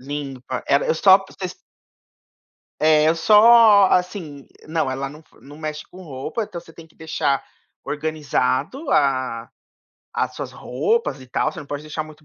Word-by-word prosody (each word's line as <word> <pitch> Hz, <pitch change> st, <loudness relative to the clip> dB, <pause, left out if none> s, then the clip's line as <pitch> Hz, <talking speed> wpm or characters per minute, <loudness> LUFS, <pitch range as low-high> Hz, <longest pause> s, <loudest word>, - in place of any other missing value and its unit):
Limpa. 135 Hz, -2 st, -6 dB
Ela 140 Hz, -, +3 dB
eu -, -, +1 dB
só 190 Hz, +3 st, +6 dB
p 195 Hz, -, -14 dB, 1.5 s
É, 155 Hz, 0 st, +4 dB
eu 160 Hz, -, +3 dB
só, 215 Hz, +2 st, +7 dB
assim 175 Hz, -6 st, -2 dB, 0.2 s
Não, 160 Hz, -4 st, -1 dB
ela 135 Hz, +1 st, -4 dB
não 150 Hz, +2 st, -12 dB
f -, -, -26 dB
não 145 Hz, +2 st, -13 dB
mexe 155 Hz, -1 st, -6 dB
com 185 Hz, -, -13 dB
roupa, 145 Hz, -, -5 dB
então 175 Hz, -4 st, -7 dB
você 165 Hz, -, -17 dB
tem 165 Hz, -1 st, -14 dB
que -, -, -28 dB
deixar 145 Hz, -3 st, -1 dB, 0.4 s
organizado 155 Hz, -, -2 dB
a 130 Hz, -5 st, 0 dB, 0.6 s
as -, -, -2 dB
suas -, -, -6 dB
roupas 450 Hz, -, -2 dB
e 130 Hz, -, -13 dB
tal. 155 Hz, -, -1 dB
Você -, -, -8 dB
não 145 Hz, -, -11 dB
pode 145 Hz, +1 st, -5 dB
deixar 155 Hz, +1 st, -5 dB
muito 155 Hz, 0 st, -15 dB
155 Hz, 165 wpm, -21 LUFS, 140-180 Hz, 1.5 s, só